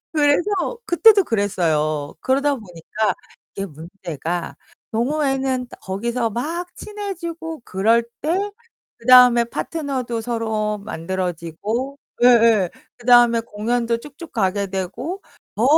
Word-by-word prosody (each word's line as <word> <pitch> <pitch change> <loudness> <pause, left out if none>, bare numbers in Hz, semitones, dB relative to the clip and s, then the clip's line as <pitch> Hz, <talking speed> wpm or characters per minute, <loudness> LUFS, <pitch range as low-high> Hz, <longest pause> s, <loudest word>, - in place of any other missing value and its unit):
그래서 290 0 +3 0.4
그때도 420 +2 +6
그랬어요. 155 - 0
그러다 280 +2 +2
보니까 210 0 -3 0.4
이게 195 - -3
문제가 170 0 -5 0.4
동호회는 265 0 0
거기서 230 +5 -2
막 335 - -4
친해지고 340 -6 -6
그럴 220 +5 +2 0.2
때 370 +7 0 0.5
그다음에 250 0 +7
파트너도 255 -3 -3
서로 220 -2 -2
만들어지고 190 - -4 0.2
예예. 230 -6 +5 0.3
그다음에 240 -1 +5
공연도 230 +2 -1
쭉쭉 295 +5 -11
가게 200 -1 0
되고 240 - -4 0.3
더, 225 - +1
235 Hz, 255 characters per minute, -21 LUFS, 195-280 Hz, 0.5 s, 그다음에